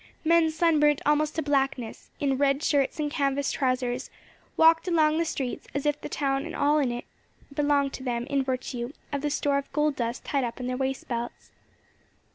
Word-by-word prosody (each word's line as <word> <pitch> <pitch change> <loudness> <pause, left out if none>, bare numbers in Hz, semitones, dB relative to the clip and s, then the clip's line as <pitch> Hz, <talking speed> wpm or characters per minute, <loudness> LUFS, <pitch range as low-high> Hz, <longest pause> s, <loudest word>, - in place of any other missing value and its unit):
Men 335 0 +5
sunburnt 310 -3 +3
almost 300 +1 +2
to 320 - -1
blackness, 270 -5 -1
in 275 -2 +1
red 280 +1 +2
shirts 280 0 +1
and 295 -1 -1
canvas 280 -2 0
trousers, 255 -1 -1 0.5
walked 325 +2 +5
along 315 -2 +3
the 335 - +1
streets 265 -5 -4
as 280 - -2
if 295 0 0
the - - -6
town 275 -1 0
and - - -7
all 295 +1 +3
in 265 -4 +1
it 240 0 -5 0.5
belonged 285 -1 +1
to 260 - -7
them 240 -2 -2
in 275 0 0
virtue 255 -1 -3 0.2
of 280 - -1
the 295 - 0
store 285 -1 +1
of 280 - -9
gold 300 0 +1
dust 235 +1 -3
tied 275 -2 0
up 235 0 -4
in 250 - -4
their 250 0 -2
waist 265 0 -2
belts. 235 -1 -5
280 Hz, 195 wpm, -27 LUFS, 260-300 Hz, 0.5 s, Men